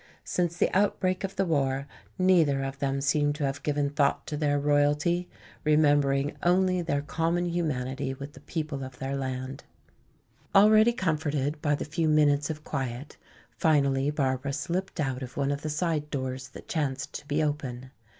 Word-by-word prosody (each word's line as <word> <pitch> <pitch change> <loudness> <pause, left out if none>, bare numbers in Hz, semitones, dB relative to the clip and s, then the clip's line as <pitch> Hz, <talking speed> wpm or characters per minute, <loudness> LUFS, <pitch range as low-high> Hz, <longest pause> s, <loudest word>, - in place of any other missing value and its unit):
Since 175 -1 -1
the - - +1
outbreak 185 -2 +1
of 195 0 -4
the 195 - +1
war 140 -4 0 0.3
neither 165 -7 +3
of 135 0 -5
them 135 -1 -1
seem 145 +1 +2
to 150 0 -4
have 135 +1 -3
given 145 -1 0
thought 145 -1 +1
to 150 - -4
their 145 -1 +1
royalty, 150 +4 +2 0.3
remembering 145 -2 +3
only 185 +1 +3
their 145 -4 -1
common 165 +3 0
humanity 135 -6 -2
with 140 +2 -8
the - - -13
people 155 -4 -4
of 130 -1 -9
their 135 +1 -3
land. 130 0 -4 0.9
Already 215 +3 +7
comforted 150 - -1
by 150 -1 +2
the - - -4
few 160 +2 -1
minutes 145 -1 +3
of 155 -1 -5
quiet, 130 0 -4 0.3
finally 140 -3 +2
Barbara 140 -2 -1
slipped 175 +6 -3
out 135 -3 -1
of 125 -1 -8
one 140 0 +1
of 140 0 -2
the 155 - -3
side 155 -1 -1
doors 130 -2 -4
that - - -12
chanced 140 -3 -2
to 145 - -7
be 150 +1 +1
open. 130 -4 -3
145 Hz, 170 wpm, -28 LUFS, 135-160 Hz, 0.9 s, Already